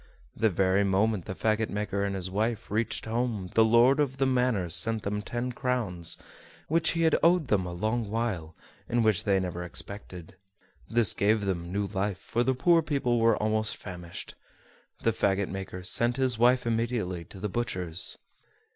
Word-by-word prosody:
The 110 - +2
very 95 +1 +2
moment 100 0 +1
the 95 - -5
fagot 110 +1 0
maker 100 -1 -2
and 100 -1 -1
his 95 -1 -3
wife 110 +2 -2
reached 110 +1 0
home 110 -5 -2
the 115 - +5
lord 120 +5 +5
of 135 -3 0
the 135 - +2
manor 125 -8 +1
sent 105 +6 +1
them 105 +1 -2
ten 120 +3 -3
crowns, 115 -10 -2 0.5
which 160 +1 +2
he 165 0 0
had 160 -2 +4
owed 170 -5 +3
them 95 -4 +1
a - - -5
long 110 +5 -2
while, 100 -8 -2 0.3
and 120 -1 +2
which 105 -1 +3
they 100 -2 +3
never 90 -1 -4
expected. 90 -1 -8 0.5
This 115 -4 +4
gave 105 +1 +2
them 85 -3 -3
new 100 +2 -1
life, 100 -1 -2
for 115 - -2
the 130 +1 +1
poor 165 +6 +4
people 135 -6 0
were 115 0 +4
almost 110 0 0
famished. 90 -3 -8 0.7
The 115 - +2
fagot 100 -2 +1
maker 95 -1 -6
sent 120 +6 +1
his 130 -4 +1
wife 125 +1 +4
immediately 115 -6 -1
to 95 - -12
the 105 - -2
butcher's. 90 -6 -2
110 Hz, 175 wpm, -28 LUFS, 95-120 Hz, 0.7 s, the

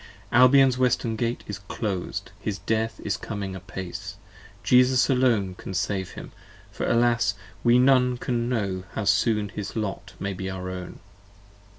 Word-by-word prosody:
Albion's 130 +1 +6
Western 125 -3 +1
Gate 115 +2 -2
is 105 -1 -6
clos'd: 100 -2 -4
his 100 -2 -3
death 110 +2 -1
is 105 +1 -1
coming 100 -3 -5
apace: 95 +1 -7 0.5
Jesus 125 +1 +4
alone 120 -7 +2
can 95 +1 -8
save 95 +2 -2
him: - - -9 0.4
for - - -3
alas, 120 0 +2 0.3
we 120 +1 +5
none 125 -1 +4
can 120 -1 -1
know 100 -6 -1
^How 105 -3 -2
soon 105 +1 +2
his 100 +3 -6
lot 100 -3 -4
may 100 0 -2
be 95 +1 -5
our 90 -1 -5
own. 90 -1 -8
110 Hz, 150 wpm, -25 LUFS, 95-125 Hz, 0.5 s, Albion's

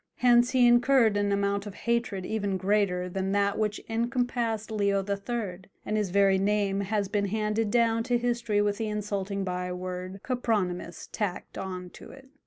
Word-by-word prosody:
Hence 240 0 +4
he 255 -2 +4
incurred 240 -2 +5
an 205 0 +1
amount 200 0 0
of 205 - -8
hatred 235 -5 -1
even 200 -2 -1
greater 185 -2 +1
than 190 +1 -2
that 200 0 +1
which 210 -1 0
encompassed 235 -1 -1
Leo 200 -2 +1
III., 200 -2 -3 0.3
and 215 - -1
his 210 -3 0
very 195 0 +4
name 200 0 +1
has 200 0 -1
been 200 +1 0
handed 215 +1 0
down 230 0 +2
to 245 -1 +2
history 235 -3 0
with 205 -1 0
the 225 - -1
insulting 200 -2 -2
byword 180 +1 -4
Copronymus 205 -9 -2
tacked 205 -5 -4
on 180 -2 -6
to - - -12
it. 270 0 -14
205 Hz, 165 wpm, -28 LUFS, 195-230 Hz, 0.3 s, incurred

